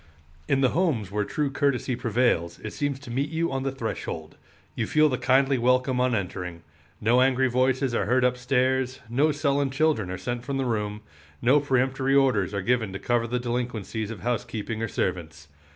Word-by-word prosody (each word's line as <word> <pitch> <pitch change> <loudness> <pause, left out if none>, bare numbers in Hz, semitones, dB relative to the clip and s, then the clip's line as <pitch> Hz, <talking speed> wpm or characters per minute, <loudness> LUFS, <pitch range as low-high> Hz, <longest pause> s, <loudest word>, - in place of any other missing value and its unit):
In 135 - +2
the 130 - +4
homes 135 - 0
where 105 0 0
true 145 +6 -2
courtesy 140 -3 0
prevails 115 -8 0
it 110 - -5
seems 145 -2 -2
to 120 - -9
meet 135 +4 -1
you 165 0 -1
on 135 0 -2
the 135 0 -1
threshold. 120 -4 -5 0.4
You 115 - -2
feel 155 0 +4
the 130 - -2
kindly 135 +1 +3
welcome 125 +1 +2
on 125 -1 +2
entering. 90 -3 -4 0.4
No 120 +4 +3
angry 130 0 +3
voices 130 +1 +1
are 100 -4 0
heard 125 +2 +3
up 125 0 +2
stairs, 130 0 0
no 145 +6 +3
sullen 140 -1 +1
children 135 -8 +1
are 95 - -4
sent 120 +5 -4
from 140 +1 -3
the 135 - -1
room, 105 -3 -2 0.4
no 130 +5 +4
peremptory 135 0 +1
orders 125 -9 +3
are 100 -2 -3
given 115 -2 +1
to - - -3
cover 120 +2 0
the 125 +2 -1
delinquencies 120 -3 -3
of 115 -5 -7
housekeeping 115 -2 -3
or 115 - 0
servants. 80 -6 -3
125 Hz, 190 wpm, -26 LUFS, 110-135 Hz, 0.4 s, the